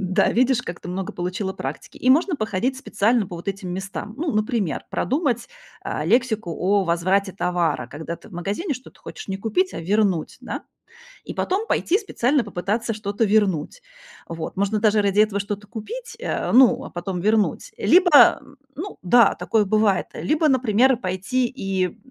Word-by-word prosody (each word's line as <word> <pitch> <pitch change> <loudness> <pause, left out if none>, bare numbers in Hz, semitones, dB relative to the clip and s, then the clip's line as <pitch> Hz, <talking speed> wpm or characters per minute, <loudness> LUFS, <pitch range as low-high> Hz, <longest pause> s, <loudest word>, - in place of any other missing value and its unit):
Да, 185 -1 +2
видишь, 255 +1 +2
как 170 - -7
ты - - -9
много 185 +1 -4
получила 185 +2 -3
практики. 135 -4 -7
И 255 - +2
можно 320 +5 +3
походить 225 +3 -1
специально 225 -3 +1
по 175 - -7
вот 170 +3 -7
этим 195 -2 -4
местам. 195 +2 -6
Ну, 315 +2 -2
например, 215 - -1
продумать, 260 -4 -1 0.3
а, 150 - -3
лексику 220 -1 +1
о 195 +4 +1
возврате 185 +3 +1
товара, 175 -8 -1
когда 160 +6 -6
ты - - -17
в 215 - -18
магазине 200 - -3
что-то 255 +1 -13
хочешь - - -9
не 195 - -2
купить, 225 - 0
а - - -4
вернуть, 190 -1 0
да? - - -6 0.6
И - - -6
потом 400 +5 -1
пойти 385 -2 +1
специально 280 - 0
попытаться 220 +6 -2
что-то 210 +1 -1
вернуть. 205 - +1 0.5
Вот. 165 -1 -6
Можно 200 +2 0
даже 215 -1 +3
ради 200 +1 +2
этого 210 -2 +2
что-то 205 +1 -5
купить, 450 - -8
э, - - -2
ну 255 +1 +5
а - - -9
потом 175 +1 -4
вернуть. 215 +1 +1
Либо, 355 -5 +6 0.3
ну 365 +8 -7
да, 235 +6 +5
такое 220 -2 +1
бывает, 205 -1 +2
либо, 310 +1 +1
например, 255 0 +3
пойти 195 +6 -1
и 190 -4 -2
210 Hz, 170 wpm, -22 LUFS, 185-250 Hz, 0.6 s, Либо